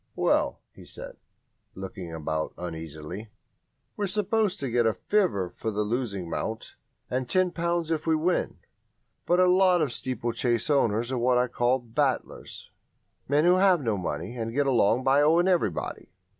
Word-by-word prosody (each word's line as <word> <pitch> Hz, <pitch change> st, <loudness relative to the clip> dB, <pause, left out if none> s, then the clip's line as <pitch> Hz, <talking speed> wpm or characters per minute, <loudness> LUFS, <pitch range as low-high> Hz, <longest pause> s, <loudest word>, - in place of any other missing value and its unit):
"Well," -, -, +1 dB
he -, -, -14 dB
said, -, -, -10 dB, 0.6 s
looking 95 Hz, -2 st, -7 dB
about 80 Hz, -1 st, -3 dB
uneasily, 80 Hz, +4 st, -7 dB, 0.7 s
"we're 205 Hz, -, -1 dB
supposed 210 Hz, +1 st, 0 dB
to 135 Hz, -3 st, -2 dB
get 120 Hz, -1 st, +3 dB
a 110 Hz, -, +1 dB
fiver 100 Hz, -, 0 dB
for -, -, -7 dB
a -, -, +2 dB
losing 105 Hz, -5 st, -2 dB
mount 110 Hz, +6 st, -4 dB, 0.3 s
and 130 Hz, 0 st, -2 dB
ten 185 Hz, -1 st, +2 dB
pounds 170 Hz, -1 st, -1 dB
if 160 Hz, 0 st, -2 dB
we 160 Hz, -, +4 dB
win, 170 Hz, +3 st, 0 dB, 0.7 s
but 175 Hz, +1 st, +3 dB
a 185 Hz, -, +6 dB
lot 180 Hz, 0 st, +4 dB
of 155 Hz, -4 st, +1 dB
the -, -, -7 dB
steeplechase 120 Hz, +1 st, -1 dB
owners 120 Hz, -3 st, +2 dB
are 130 Hz, -, -1 dB
what 125 Hz, +1 st, +3 dB
I 125 Hz, -, +3 dB
call 120 Hz, +2 st, +1 dB
'battlers' 130 Hz, +2 st, -3 dB, 0.6 s
men 145 Hz, +3 st, +3 dB
who 180 Hz, +1 st, +5 dB
have 185 Hz, -2 st, +5 dB
no 115 Hz, -4 st, 0 dB
money 90 Hz, +3 st, -4 dB
and 115 Hz, -1 st, -3 dB
get 145 Hz, 0 st, +2 dB
along 125 Hz, -2 st, +3 dB
by 135 Hz, +2 st, +4 dB
owing 165 Hz, +4 st, +4 dB
everybody. 170 Hz, -, -1 dB
125 Hz, 165 wpm, -27 LUFS, 110-170 Hz, 0.7 s, a